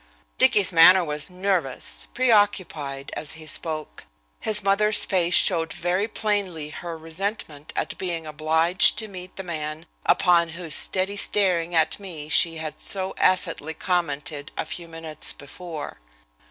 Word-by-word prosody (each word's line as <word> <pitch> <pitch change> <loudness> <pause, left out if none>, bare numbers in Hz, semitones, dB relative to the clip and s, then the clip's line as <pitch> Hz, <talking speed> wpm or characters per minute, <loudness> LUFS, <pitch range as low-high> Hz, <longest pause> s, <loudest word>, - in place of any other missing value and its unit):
Dicky's 200 -2 +4
manner 180 +2 +7
was 150 +2 -2
nervous, 180 -7 -2
preoccupied, 190 - +1
as 150 - -6
he 160 0 -12
spoke. 155 - -5 0.3
His 210 -2 +2
mother's 210 +2 +3
face 180 -2 +2
showed 165 -4 +3
very 180 +4 -1
plainly 200 -9 -1
her 170 0 -7
resentment 160 -2 -5
at - - -3
being 170 -3 -3
obliged 160 +5 +3
to 220 0 -2
meet 185 -2 -9
the 195 - -6
man 155 -2 -5 0.2
upon 170 -2 +3
whose 170 -4 -1
steady 190 +5 +2
staring 180 -5 +1
at 160 +3 +2
me 165 -7 -8
she 165 +1 +4
had 155 -1 -6
so 190 -1 -2
acidly 165 -4 +1
commented 155 -4 -2
a - - -2
few 170 -1 -7
minutes 165 -2 -1
before. 155 - -9
170 Hz, 140 wpm, -24 LUFS, 155-190 Hz, 0.3 s, manner